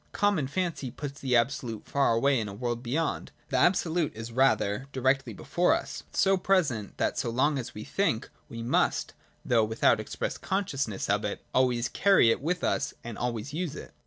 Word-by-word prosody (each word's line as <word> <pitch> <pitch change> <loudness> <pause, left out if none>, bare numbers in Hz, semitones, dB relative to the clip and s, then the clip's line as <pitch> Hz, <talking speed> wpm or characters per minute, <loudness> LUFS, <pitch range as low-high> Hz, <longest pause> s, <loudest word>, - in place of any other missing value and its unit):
Common 200 -9 +1
fancy 170 -4 -2
puts 140 +2 -7
the 130 -2 +1
Absolute 115 -2 0
far 140 -4 +2
away 135 +2 +3
in 110 - -3
a 100 - -7
world 120 +1 -3
beyond. 140 +7 -2 0.2
The 135 - 0
Absolute 170 - +2
is 115 +1 -7
rather 130 -2 +2
directly 135 +1 +1
before 180 +1 +1
us, - - -6
so 195 0 +3
present 160 - 0
that - - 0
so - - -1
long 135 +4 +1
as 120 - -7
we 105 - -6
think, 155 - 0 0.2
we 115 0 -6
must, 120 - +1 0.3
though 115 -2 +3
without 110 +1 +3
express - - -4
consciousness 140 - -2
of - - +1
it, - - -4
always 125 -2 +2
carry 195 -13 +4
it - - -1
with 175 +4 -1
us 135 - 0
and 120 -2 -6
always 120 +3 -3
use 165 -1 -3
it. - - -9
130 Hz, 185 wpm, -28 LUFS, 115-160 Hz, 0.3 s, carry